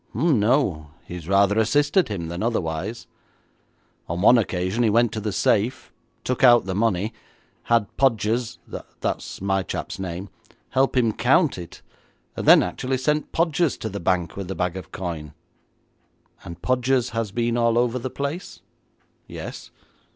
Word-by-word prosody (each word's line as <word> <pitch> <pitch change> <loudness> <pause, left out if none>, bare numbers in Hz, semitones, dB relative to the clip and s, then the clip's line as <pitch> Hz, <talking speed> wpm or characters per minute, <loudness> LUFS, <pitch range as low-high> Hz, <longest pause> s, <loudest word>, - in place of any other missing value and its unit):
'Oh 160 +9 +2
no, 105 - +2 0.2
he - - -8
has 85 -3 -7
rather 100 +2 +3
assisted 145 - +3
him 95 -6 -4
than 85 +1 -5
otherwise. 105 -1 -2 1.0
On 85 +1 -2
one 120 +3 +7
occasion 95 +1 -1
he 115 - +3
went 115 +1 +3
to 110 - -4
the 105 0 -3
safe, 105 +5 0 0.3
took 125 0 -2
out 120 -4 +7
the 95 - -3
money, 105 +1 0 0.5
had 115 -2 +3
Podgers 120 -1 +1 0.4
that's - - -3
my 95 0 +1
chap's 95 +1 -5
name 95 +1 -5 0.4
help 135 0 +1
him 115 -3 +3
to - - -16
count 135 - +3
it, 85 - -10 0.5
and - - -4
then - - +8
actually 130 +1 -2
sent 150 +4 -1
Podgers 165 -1 +1
to 110 - -4
the 100 0 -5
bank 90 -2 0
with 100 -2 -5
the 95 - -4
bag 90 0 -1
of 95 - -8
coin.' 80 -5 -6 1.1
'And 85 0 -10
Podgers 125 0 +1
has 115 -3 -2
been 120 +2 0
all 115 -1 +2
over 120 +1 +1
the 130 - -4
place?' 140 +7 -5 0.7
'Yes.' - - -8
110 Hz, 160 wpm, -23 LUFS, 95-125 Hz, 1.1 s, then